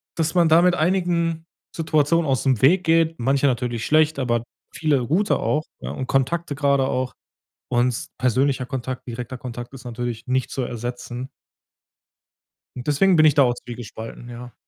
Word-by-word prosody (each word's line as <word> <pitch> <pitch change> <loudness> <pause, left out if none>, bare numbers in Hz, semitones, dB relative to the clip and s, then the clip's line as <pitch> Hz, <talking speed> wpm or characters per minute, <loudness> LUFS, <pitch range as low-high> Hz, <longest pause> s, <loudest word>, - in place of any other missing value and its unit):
dass 160 -1 0
man 175 -2 +4
da 160 +2 +6
mit 180 0 +4
einigen 170 -2 0 0.3
Situationen 160 0 +2
ausm 130 -4 +1
Weg 175 +8 +4
geht, 165 0 +3
manche 135 +3 +2
natürlich 120 -3 -1
schlecht, 155 0 +3
aber 120 -3 0 0.3
viele 145 -6 +1
gute 190 - +2
auch, 150 - 0 0.2
ja - - -5
und 130 - -5
Kontakte 145 +4 0
gerade 140 -2 +2
auch 130 -1 -1 0.6
und 125 +5 0
persönlicher 130 +1 +1
Kontakt, 130 0 -5
direkter 125 +1 -6
Kontakt 120 -1 -7
ist 130 -1 -11
natürlich 120 0 -5
nicht 130 0 0
zu 130 - -2
ersetzen. 120 +1 -5 1.5
Und 125 +2 -7
deswegen 175 +6 +4
bin 155 -1 +6
ich 150 -2 +5
da 140 - +6
auch 120 -2 +2
zwiegespalten, 120 -1 -9
ja. 120 0 -9
135 Hz, 160 wpm, -22 LUFS, 125-155 Hz, 1.5 s, da